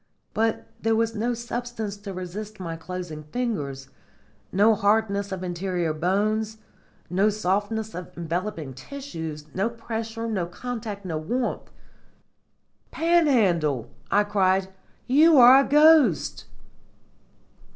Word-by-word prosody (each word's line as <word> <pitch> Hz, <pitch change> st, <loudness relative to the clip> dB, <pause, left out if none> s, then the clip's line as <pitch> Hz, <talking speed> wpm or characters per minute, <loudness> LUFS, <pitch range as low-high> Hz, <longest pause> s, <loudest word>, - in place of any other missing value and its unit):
But 225 Hz, 0 st, 0 dB, 0.2 s
there 225 Hz, 0 st, +2 dB
was 225 Hz, 0 st, +1 dB
no 235 Hz, +2 st, -1 dB
substance 235 Hz, -3 st, -4 dB
to 205 Hz, -1 st, -8 dB
resist 195 Hz, +4 st, -7 dB
my 165 Hz, -3 st, -4 dB
closing 165 Hz, -1 st, -6 dB
fingers, 150 Hz, -, -3 dB, 0.6 s
no 210 Hz, +4 st, +5 dB
hardness 200 Hz, -1 st, +1 dB
of 185 Hz, -1 st, -4 dB
interior 175 Hz, -2 st, -2 dB
bones, 210 Hz, +6 st, 0 dB, 0.5 s
no 195 Hz, +4 st, +2 dB
softness 210 Hz, +2 st, -1 dB
of 180 Hz, 0 st, -8 dB
enveloping 170 Hz, -3 st, -3 dB
tissues, 160 Hz, -, -7 dB
no 195 Hz, +5 st, 0 dB
pressure, 225 Hz, 0 st, -5 dB
no 190 Hz, -6 st, -1 dB
contact, 215 Hz, 0 st, -6 dB
no 160 Hz, -4 st, -2 dB
warmth. 240 Hz, +10 st, -2 dB, 1.2 s
"Panhandle," 215 Hz, -, +2 dB, 0.2 s
I 205 Hz, +1 st, +4 dB
cried, 190 Hz, -2 st, +1 dB, 0.4 s
"you 305 Hz, +5 st, +5 dB
are 255 Hz, +1 st, +9 dB
a -, -, -6 dB
ghost!" 300 Hz, -, +5 dB
205 Hz, 110 wpm, -25 LUFS, 180-230 Hz, 1.2 s, are